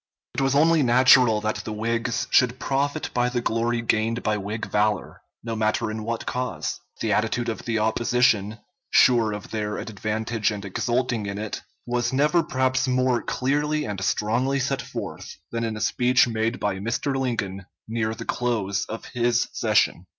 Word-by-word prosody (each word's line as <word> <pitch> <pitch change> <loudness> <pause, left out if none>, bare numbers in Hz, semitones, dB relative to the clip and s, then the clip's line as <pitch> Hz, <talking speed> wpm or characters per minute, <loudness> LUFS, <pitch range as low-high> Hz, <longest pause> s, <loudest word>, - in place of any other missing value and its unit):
It - - -1
was 135 0 +2
only 160 +2 +5
natural 125 -3 +5
that 110 0 -1
the 105 +1 -6
Whigs 115 +2 -1
should 125 0 +4
profit 140 +3 -1
by 125 0 +2
the 125 0 -1
glory 115 0 0
gained 115 +1 0
by 110 -1 +1
Whig 105 +2 -4
valor, 105 0 0 0.2
no 115 0 -3
matter 110 0 0
in 110 0 -5
what 115 +1 -3
cause. 125 -12 -3 0.2
The 110 -2 +1
attitude 110 +3 0
of 110 - -5
the 115 -2 0
opposition 110 -1 +2 0.3
sure 120 -4 +5
of 105 -1 -7
their 105 -1 -2
advantage 110 +1 -2
and 105 -2 -5
exulting 120 +2 -1
in 100 0 -4
it 105 0 -4 0.2
was 120 0 0
never 150 +6 +3
perhaps 130 -2 0
more 130 -1 +2
clearly 150 +3 0
and 100 -3 -4
strongly 120 +7 +1
set 135 +1 -1
forth - - -7
than 115 0 -2
in 110 -1 -2
a - - -6
speech 125 0 +3
made 115 +1 -1
by 100 -2 -1
Mr. 115 +6 -1
Lincoln 100 -7 -2 0.2
near 110 0 -1
the - - -7
close 105 -5 -1
of 110 - -7
this 120 0 +1
session. - - +1
115 Hz, 170 wpm, -24 LUFS, 110-125 Hz, 0.3 s, only